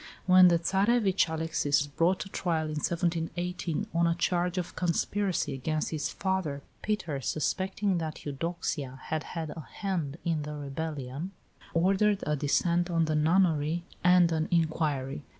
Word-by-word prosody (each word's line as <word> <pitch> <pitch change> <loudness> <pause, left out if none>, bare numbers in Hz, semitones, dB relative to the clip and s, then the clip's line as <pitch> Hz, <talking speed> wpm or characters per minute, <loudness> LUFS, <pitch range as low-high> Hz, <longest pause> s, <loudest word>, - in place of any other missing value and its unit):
When 185 0 +8
the 170 -1 +5
Tsarevitch, 195 +2 +2
Alexis, 160 -3 +1
was - - -1
brought 170 +6 +1
to 195 - -6
trial 170 -4 -1
in 155 - -4
1718 175 +2 -1
on 170 0 +3
a 170 - +2
charge 175 +1 0
of 180 -2 -3
conspiracy 180 -2 0
against 155 +4 -2
his 155 -2 -2
father, 180 -8 -2 0.2
Peter, 175 -10 -2
suspecting 190 - 0
that 160 -2 -5
Eudoxia 145 -3 -3
had 160 -1 -2
had 160 -3 -5
a 165 - -7
hand 170 -8 -3
in 165 -3 0
the 150 0 -5
rebellion, 145 +2 -5 0.4
ordered 195 +4 +3
a 150 - +1
descent 170 +5 +1
on 165 -1 +2
the 155 - -1
nunnery 160 0 +2 0.2
and 180 -1 +6
an 160 -1 0
inquiry. 155 - 0
165 Hz, 150 wpm, -29 LUFS, 150-180 Hz, 0.4 s, When